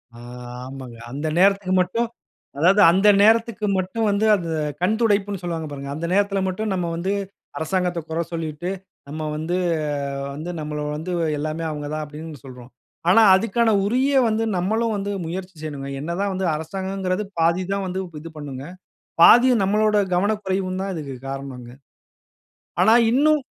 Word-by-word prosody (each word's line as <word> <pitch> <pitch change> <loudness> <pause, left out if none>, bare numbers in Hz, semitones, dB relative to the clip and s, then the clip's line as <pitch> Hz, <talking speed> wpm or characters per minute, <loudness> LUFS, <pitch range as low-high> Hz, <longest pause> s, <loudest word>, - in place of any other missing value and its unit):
ஆ - - -12 0.5
ஆமங்க. 130 -3 -9
அந்த 145 +4 -3
நேரத்திக்கு 195 0 +3
மட்டும் 230 +7 -1 0.5
அதாவது 185 +7 +5
அந்த 195 +4 +3
நேரத்திற்கு 225 0 +3
மட்டும் 190 +5 -1
வந்து 200 +2 +1
அந்த 170 -4 -4 0.3
கண் 190 +5 +2
துடைப்புன்ணு 205 -4 +1
சொல்லுவாங்க 165 -3 -4
பாருங்க. 140 -1 -6
அந்த 165 - -4
நேரத்தில 200 0 +2
மட்டும் 205 +3 -2
நம்ம 180 -2 -1
வந்து 185 +4 -2 0.5
அரசாங்கத்த 180 +1 -1
குற 160 - -2
சொல்லிட்டு, 165 0 -4 0.4
நம்ம 155 +2 -5
வந்து 160 +3 -2 0.8
வந்து 155 +4 -6
நம்மள 150 0 -4 0.2
வந்து 170 +4 -5 0.3
எல்லாமே 155 +2 -3
அவுங்க 150 -1 -5
தான் 155 - -3
அப்பிடின்னு 150 -2 -9
சொல்றோம். 125 -1 -11 0.4
ஆனா, 225 +4 +7
அதுக்கான 225 +3 +2
உரிய 260 +6 +2
வந்து 220 +1 0
நம்மளும் 220 +5 0
வந்து 200 0 -3 0.2
முயற்சி 185 +2 -6
செய்யணுங்க. 145 -3 -6
என்ன 155 +4 -5
தான் 200 - 0
வந்து 185 0 -1
அரசாங்கங்கிறது 190 +4 -3 0.2
பாதி 170 +3 +2
தான் 195 -1 -1
வந்து 185 +1 -3 0.2
இது 165 - -9
பண்ணுங்க. 140 -3 -7 0.6
பாதி 245 +6 +8
நம்மளாட 210 +2 +2 0.2
கவன 205 +4 +2
குறைவு 190 0 -1
தான் 195 0 -3
இதற்கு 145 -5 -6
காரணங்க. 135 -3 -7 1.1
ஆனா 220 - +6 0.2
இன்னும் 300 +3 +3
185 Hz, 150 wpm, -22 LUFS, 155-205 Hz, 1.1 s, பாதி